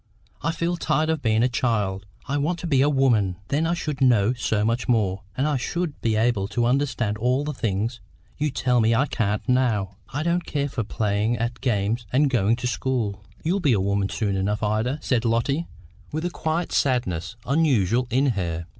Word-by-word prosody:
I 165 - 0
feel 170 +1 -1
tired 155 -1 +1
of 160 -2 -2
being 110 -2 +2
a - - +4
child; 105 -6 -1 0.2
I 140 - -1
want 165 +5 0
to 175 - -6
be 140 -6 +3
a 145 - +4
woman. 120 -10 +2
Then 155 +3 +1
I 170 - +1
should 150 -5 -4
know 120 -3 +4
so 110 -4 0
much 115 +3 -1
more, 100 -5 +1 0.2
and 135 +3 +1
I 150 -2 +1
should 170 +4 -3
be 110 -1 +1
able 110 -3 +1
to 120 +3 0
understand 120 -5 0
all 125 +4 +1
the 150 +1 -3
things 115 0 -2 0.4
you 150 +1 0
tell 125 -2 +1
me 115 +1 +3
I 130 +5 +3
can't 105 -6 -1
now. 110 -7 +1
I 145 +3 -2
don't 170 +1 +1
care 145 -2 -2
for 125 -3 -2
playing 105 +2 0
at 115 +2 -3
games 115 -1 0
and 140 +2 +3
going 115 -2 +3
to 125 +1 -6
school." 120 -5 -1 0.2
"You'll 180 +5 +1
be 145 -9 +3
a 105 - +2
woman 100 0 0
soon 100 -4 -1
enough, 105 +3 -1
Ida," 110 +6 0
said 120 -3 +1
Lotty, 120 +8 0 0.4
with 155 +3 -3
a 175 - -1
quiet 165 +1 -2
sadness 115 - 0
unusual 125 - +2
in 130 +3 +2
her. 85 -5 -3
120 Hz, 200 wpm, -24 LUFS, 105-140 Hz, 0.4 s, a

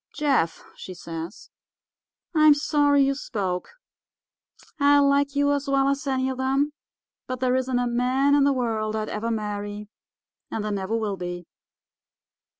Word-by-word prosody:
"'Jeff,' 270 - +1
she 185 - -9
says, 165 +2 -8 0.8
'I'm 310 -2 +6
sorry 290 -1 +3
you 275 - +1
spoke. 195 -9 -3 1.1
I 285 0 +5
like 280 0 +3
you 285 0 +2
as 285 0 -2
well 275 0 +2
as 280 +1 -2
any 260 -1 0
of 260 -1 -4
them, 275 +3 +1 0.5
but 255 -1 -4
there 255 0 +1
isn't 260 -1 0
a 245 - +1
man 250 +4 +2
in 285 -1 +5
the 280 - +4
world 220 -4 -1
I'd 215 0 -3
ever 220 +2 -3
marry, 210 -1 -4 0.6
and 220 - -3
there 210 - -2
never 200 +2 -2
will 210 -3 -2
be. 175 -1 -6
255 Hz, 150 wpm, -25 LUFS, 210-280 Hz, 1.1 s, I'm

